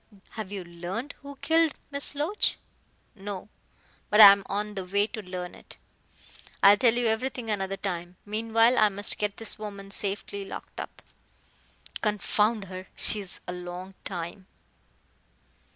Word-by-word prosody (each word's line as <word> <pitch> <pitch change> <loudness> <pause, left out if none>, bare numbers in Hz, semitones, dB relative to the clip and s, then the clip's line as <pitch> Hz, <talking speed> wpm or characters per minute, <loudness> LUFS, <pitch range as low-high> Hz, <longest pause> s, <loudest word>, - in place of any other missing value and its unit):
"Have 215 -3 -6
you 195 -2 -4
learned 175 +10 -6
who 280 0 -9
killed 325 -2 +3 0.2
Miss 280 0 -1
Loach?" 320 +9 +2 0.6
"No. 200 0 -7 0.6
But 210 - +3
I 205 -2 +13
am 200 0 +2
on 210 +1 -2
the 195 -2 -4
way 200 +3 +1
to 220 0 -7
learn 180 -2 -6
it. - - -12 0.9
I'll 200 +1 +9
tell 235 +2 +4
you 245 0 +1
everything 230 +1 -1
another 195 -1 -2
time. 175 -2 -4
Meanwhile, 225 +3 +3
I 215 - +6
must 205 +1 +2
get 205 -1 -1
this 225 -1 -3
woman 200 -2 -7
safely 200 0 -3
locked 195 - -9
up. - - -8 1.0
Confound 210 0 +1
her, 185 0 -8
she 215 - +3
is 190 -3 -5
a 180 - -3
long 180 +1 -7
time." 180 +1 -6
205 Hz, 150 wpm, -27 LUFS, 190-225 Hz, 1.0 s, I